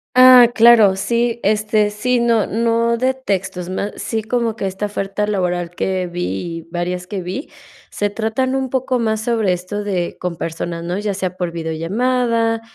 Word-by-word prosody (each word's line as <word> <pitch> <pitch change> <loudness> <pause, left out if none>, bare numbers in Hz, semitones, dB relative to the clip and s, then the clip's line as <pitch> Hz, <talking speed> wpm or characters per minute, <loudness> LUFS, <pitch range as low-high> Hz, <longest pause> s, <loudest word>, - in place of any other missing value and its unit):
Ah, 255 -2 +8
claro, 225 -4 +6
sí, 235 +4 0
este, 210 0 +1
sí, 245 +4 0
no 235 -3 +2
no 230 +1 +1
de 260 +2 +1
textos, 190 -7 -3
más 200 +2 -3
sí 225 -1 -3
como 230 0 -1
que 195 - -3
esta 190 +2 -3
oferta 205 0 -2
laboral 180 -4 -1
que 185 +1 -2
vi 175 0 -4 0.4
y, - - -9
varias 180 +1 -3
que 190 -1 -4
vi, 190 - -5 0.4
se 205 0 -2
tratan 225 +5 -1
un 265 -1 -1
poco 260 0 -1
más 220 -2 0
sobre 225 -5 +1
esto 185 +4 -4
de 185 -4 -2
con 180 -1 -3
personas, 170 +1 -4
¿no? 175 +3 -3
Ya 205 -1 -2
sea 185 -2 -3
por 180 -2 -3
videollamada 225 +8 0
210 Hz, 175 wpm, -19 LUFS, 180-235 Hz, 0.4 s, Ah